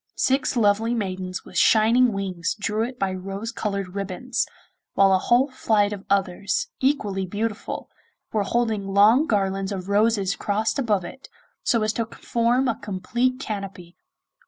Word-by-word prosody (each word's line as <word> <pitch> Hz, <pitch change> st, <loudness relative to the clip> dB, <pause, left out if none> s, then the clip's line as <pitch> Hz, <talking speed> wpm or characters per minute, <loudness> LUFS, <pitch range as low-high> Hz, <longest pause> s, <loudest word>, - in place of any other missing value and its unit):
Six 265 Hz, -1 st, +1 dB
lovely 225 Hz, +2 st, +2 dB
maidens 185 Hz, -3 st, -4 dB
with -, -, -2 dB
shining 230 Hz, +3 st, +5 dB
wings 190 Hz, -4 st, -2 dB
drew 210 Hz, +1 st, -1 dB
it 245 Hz, +2 st, -5 dB
by 195 Hz, -4 st, 0 dB
rose 195 Hz, +4 st, -5 dB
coloured 200 Hz, -3 st, -3 dB
ribbons, 200 Hz, +5 st, -2 dB, 0.5 s
while 195 Hz, -1 st, +5 dB
a 190 Hz, -, +4 dB
whole 250 Hz, +7 st, +3 dB
flight 210 Hz, -5 st, +1 dB
of 200 Hz, -1 st, -8 dB
others, 195 Hz, 0 st, 0 dB
equally 205 Hz, -9 st, 0 dB
beautiful, 215 Hz, +3 st, -4 dB, 0.5 s
were 215 Hz, -, +2 dB
holding 220 Hz, -2 st, 0 dB
long 210 Hz, +9 st, +5 dB
garlands 195 Hz, -1 st, 0 dB
of 190 Hz, -1 st, -5 dB
roses 205 Hz, -2 st, +2 dB
crossed 215 Hz, +6 st, -1 dB
above 210 Hz, -8 st, +1 dB
it, 265 Hz, +9 st, -11 dB, 0.3 s
so 230 Hz, -3 st, +1 dB
as 215 Hz, 0 st, 0 dB
to 230 Hz, 0 st, -2 dB
form 240 Hz, +3 st, 0 dB
a 230 Hz, -, -1 dB
complete 235 Hz, +6 st, -1 dB
canopy. 195 Hz, -6 st, -6 dB
205 Hz, 150 wpm, -24 LUFS, 195-230 Hz, 0.5 s, shining